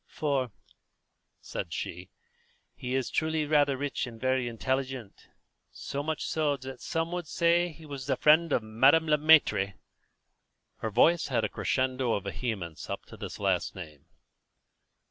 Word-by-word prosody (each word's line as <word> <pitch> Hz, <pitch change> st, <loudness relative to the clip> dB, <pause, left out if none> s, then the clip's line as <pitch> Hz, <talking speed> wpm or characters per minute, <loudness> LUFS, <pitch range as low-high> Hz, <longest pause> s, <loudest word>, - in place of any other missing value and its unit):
"For," 140 Hz, -5 st, -1 dB, 0.9 s
said -, -, -5 dB
she, -, -, -5 dB, 0.6 s
"he 125 Hz, 0 st, -4 dB
is 135 Hz, -1 st, -1 dB
truly 160 Hz, -1 st, 0 dB
rather 145 Hz, -2 st, +3 dB
rich 140 Hz, -1 st, -2 dB
and 115 Hz, -2 st, -10 dB
very 130 Hz, 0 st, +1 dB
intelligent; 130 Hz, -1 st, -3 dB, 0.4 s
so 140 Hz, -, -5 dB
much 155 Hz, +2 st, -3 dB
so 150 Hz, -3 st, 0 dB
that 130 Hz, -1 st, -9 dB
some 165 Hz, +1 st, -2 dB
would 175 Hz, -1 st, -3 dB
even 145 Hz, -, -9 dB
say 170 Hz, +1 st, +3 dB
that 170 Hz, -, -9 dB
he 160 Hz, 0 st, -14 dB
was 140 Hz, -3 st, -7 dB
the -, -, +2 dB
friend 160 Hz, +2 st, +5 dB
of 115 Hz, -, +2 dB
Madame 135 Hz, +9 st, +4 dB
Le 150 Hz, -1 st, +3 dB
Maître." 145 Hz, -11 st, +4 dB, 1.0 s
Her 110 Hz, -, -3 dB
voice 170 Hz, +10 st, +4 dB
had 120 Hz, -4 st, 0 dB
a 105 Hz, -, 0 dB
crescendo 130 Hz, -2 st, 0 dB
of 100 Hz, -, -1 dB
vehemence 100 Hz, -6 st, -4 dB
up -, -, -5 dB
to -, -, -12 dB
this -, -, -7 dB
last -, -, 0 dB
name. 75 Hz, -6 st, -10 dB
135 Hz, 160 wpm, -29 LUFS, 120-155 Hz, 1.0 s, friend